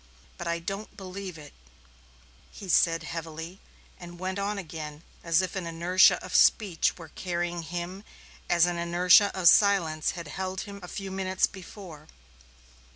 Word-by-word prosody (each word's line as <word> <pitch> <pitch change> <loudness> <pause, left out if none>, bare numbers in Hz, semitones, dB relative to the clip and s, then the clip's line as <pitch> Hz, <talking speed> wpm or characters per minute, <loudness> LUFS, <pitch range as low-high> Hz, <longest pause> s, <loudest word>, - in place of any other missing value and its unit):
But 175 - -5
I 170 0 0
don't 195 +5 -6
believe 190 -2 -7
it," 150 -2 -12 1.0
he 195 - -10
said 165 -1 +3
heavily, 165 +2 -7 0.4
and 175 0 -10
went 185 +2 -3
on 200 +1 -2
again 155 -4 -7 0.2
as 170 +2 +3
if 185 - -4
an 185 -3 -3
inertia 170 +3 +4
of - - -9
speech 195 -8 +3
were 165 -3 -11
carrying 175 0 -3
him 175 +4 -6 0.5
as 170 -1 +5
an 175 -1 -2
inertia 180 +4 +5
of 175 - +3
silence 170 -7 +4
had 170 -2 -6
held 190 0 -4
him 200 -2 -9
a 180 - -9
few 195 +1 -6
minutes 190 0 +1
before. 180 -5 -11
175 Hz, 155 wpm, -27 LUFS, 165-190 Hz, 1.0 s, as